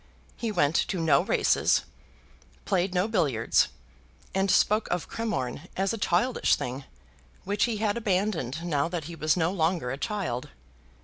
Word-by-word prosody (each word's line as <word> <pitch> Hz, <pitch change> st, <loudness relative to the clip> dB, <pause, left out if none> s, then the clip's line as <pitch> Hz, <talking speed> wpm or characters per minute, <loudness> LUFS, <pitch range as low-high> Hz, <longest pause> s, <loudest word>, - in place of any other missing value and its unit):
He 230 Hz, -2 st, -3 dB
went 165 Hz, -6 st, +2 dB
to 190 Hz, -, 0 dB
no 165 Hz, -2 st, +4 dB
races, -, -, +2 dB, 0.8 s
played 185 Hz, +1 st, 0 dB
no 180 Hz, +3 st, +2 dB
billiards, 150 Hz, -, +2 dB, 0.7 s
and 195 Hz, +1 st, +1 dB
spoke 215 Hz, +3 st, +3 dB
of 175 Hz, -1 st, -2 dB
Cremorne 180 Hz, -, -3 dB
as 195 Hz, +2 st, +1 dB
a -, -, -3 dB
childish 205 Hz, +7 st, +2 dB
thing, 130 Hz, +2 st, -5 dB, 0.6 s
which 205 Hz, +1 st, +1 dB
he 235 Hz, -3 st, -2 dB
had 210 Hz, 0 st, 0 dB
abandoned 185 Hz, -, -1 dB
now 150 Hz, -3 st, +1 dB
that 170 Hz, -2 st, -4 dB
he 170 Hz, +3 st, -7 dB
was 155 Hz, +1 st, +1 dB
no 165 Hz, 0 st, +1 dB
longer 165 Hz, -7 st, 0 dB
a 135 Hz, -, -5 dB
child. 190 Hz, -, -3 dB
180 Hz, 150 wpm, -27 LUFS, 155-205 Hz, 0.8 s, no